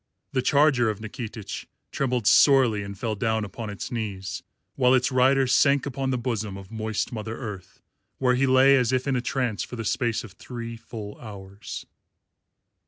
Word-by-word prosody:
The 130 - +1
charger 140 -4 +4
of 105 -1 -3
Nikitich 110 -1 -6 0.2
trembled 125 -4 -1
sorely 130 -4 +5
and 100 0 -7
fell 110 +2 -2
down 110 +1 0
upon 110 +2 -7
its 100 - -6
knees, 100 -6 -4 0.3
while 130 -1 +4
its 125 0 +2
rider 130 +1 +4
sank 140 +2 +3
upon 135 -1 -2
the 130 - +1
bosom 110 -5 -3
of 95 0 -11
moist 110 -1 -2
Mother 110 -1 -5
Earth, 105 -8 -8 0.3
where 125 -1 +3
he 135 +2 +2
lay 130 +1 +6
as 125 -2 +2
if 130 +1 0
in 135 - +1
a 125 - 0
trance 125 -4 -1
for - - -5
the 115 -1 -5
space 115 +1 0
of 110 - -10
three 115 +3 -7
full 110 -2 -9
hours. 100 -1 -8
115 Hz, 175 wpm, -25 LUFS, 105-130 Hz, 0.3 s, lay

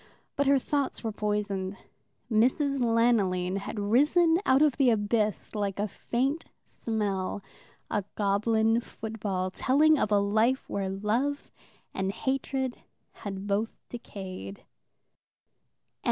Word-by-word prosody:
But 285 0 +1
her 280 0 +6
thoughts 280 0 -1
were 225 - -1
poisoned. 205 -2 -2 0.5
Mrs. 265 +5 +2
Lanoline 220 -6 +2
had 200 +2 -5
risen 300 - +4
out 265 +3 +5
of 295 -4 +2
the 270 -3 +4
abyss, 215 -1 0
like 200 -3 -2
a 205 +1 0
faint 270 +9 -2 0.2
smell, 205 -3 -3 0.5
a 205 - 0
goblin 220 +3 +2
football, 205 -5 -4
telling 300 +7 +4
of 215 - 0
a 205 - +5
life 220 +6 +2
where 195 -1 -2
love 225 +9 -1 0.4
and 190 0 -1
hatred 265 +2 -2 0.4
had 195 -2 -5
both 205 +3 -1
decayed. 185 - -8
220 Hz, 115 wpm, -28 LUFS, 200-260 Hz, 0.5 s, her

